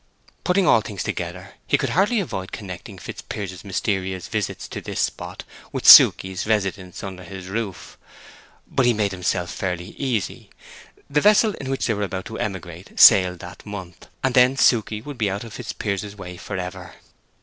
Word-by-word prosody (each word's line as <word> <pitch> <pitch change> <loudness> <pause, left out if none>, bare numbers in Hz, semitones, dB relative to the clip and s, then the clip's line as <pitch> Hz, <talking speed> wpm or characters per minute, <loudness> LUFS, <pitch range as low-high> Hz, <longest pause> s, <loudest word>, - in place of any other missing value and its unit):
Putting 185 +1 +2
all 115 - +5
things 100 -4 -5
together, - - -5
he - - +3
could - - -2
hardly 205 +6 +2
avoid 95 - -4
connecting 90 -4 -8
Fitzpiers's 95 -3 -7
mysterious 95 -2 -2
visits 110 -3 -3
to - - -6
this - - -5
spot - - -3 0.3
with - - -4
Suke's 95 +1 +8
residence 95 -4 -2
under 95 -2 -7
his 90 +1 -9
roof. 100 -3 -5 0.7
But 130 - +1
he 120 - +3
made 105 -2 0
himself 90 -1 -2
fairly 90 -1 -4
easy: 120 -9 -2 0.6
the 150 +1 +1
vessel 210 +1 +5
in 135 - -5
which 135 - -1
they 115 - +1
were 105 - -3
about 95 -2 -3
to 110 - -7
emigrate 90 -3 -6
sailed 90 -1 +8
that 90 +3 -10
month; 95 -4 -9 0.2
and 135 -1 +1
then 125 +2 +5
Suke 115 -5 +4 0.2
would 145 -3 -8
be 105 -3 +1
out 100 +3 -4
of 115 -2 -10
Fitzpiers's 100 -1 -4
way 90 -3 -8
forever. 90 -1 -6
100 Hz, 170 wpm, -22 LUFS, 90-115 Hz, 0.7 s, Suke's